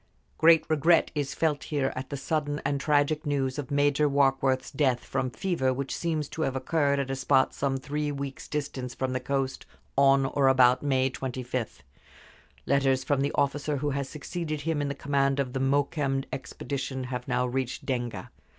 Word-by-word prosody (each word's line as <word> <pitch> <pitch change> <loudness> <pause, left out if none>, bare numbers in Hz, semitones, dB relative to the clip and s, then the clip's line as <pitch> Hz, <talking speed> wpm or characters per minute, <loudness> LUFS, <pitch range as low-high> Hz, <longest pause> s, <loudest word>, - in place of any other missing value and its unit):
Great 165 0 +6
regret 160 +2 +3
is 145 -2 -2
felt 155 -3 0
here 140 -3 -1
at 130 +1 -5
the 140 - -4
sudden 145 +1 -1
and 140 -1 0
tragic 150 +1 +2
news 140 -2 -1
of 140 - -5
Major 145 +1 +2
Warkworth's 135 -1 +2
death 135 -4 +1
from 130 -1 -1
fever, 130 -2 0
which 135 +1 -3
seems 160 -4 -1
to 160 - -5
have 135 -4 0
occurred 140 +1 +1
at 135 -1 -2
a - - -1
spot 130 0 +2
some 135 -1 -1
three 145 +2 -2
weeks' 140 -1 -6
distance 135 -4 -4
from 130 -1 -2
the 130 - 0
coast, 135 +1 -2 0.3
on 135 0 +5
or 135 0 +2
about 130 -1 +5
May 135 -2 +1
25. 130 - -4 0.8
Letters 135 -2 +2
from 135 0 +1
the 140 +1 0
officer 145 +1 0
who 145 +1 -1
has 140 -1 -2
succeeded 155 0 -4
him 155 -1 -1
in 145 - -1
the 140 - -3
command 140 0 +1
of 130 -3 -1
the 135 - -1
Mokembe 140 0 +1
expedition 130 +1 -4
have 125 0 -4
now 125 -1 +1
reached 125 0 -3
Denga. 120 -8 -3
140 Hz, 180 wpm, -27 LUFS, 130-145 Hz, 0.8 s, Great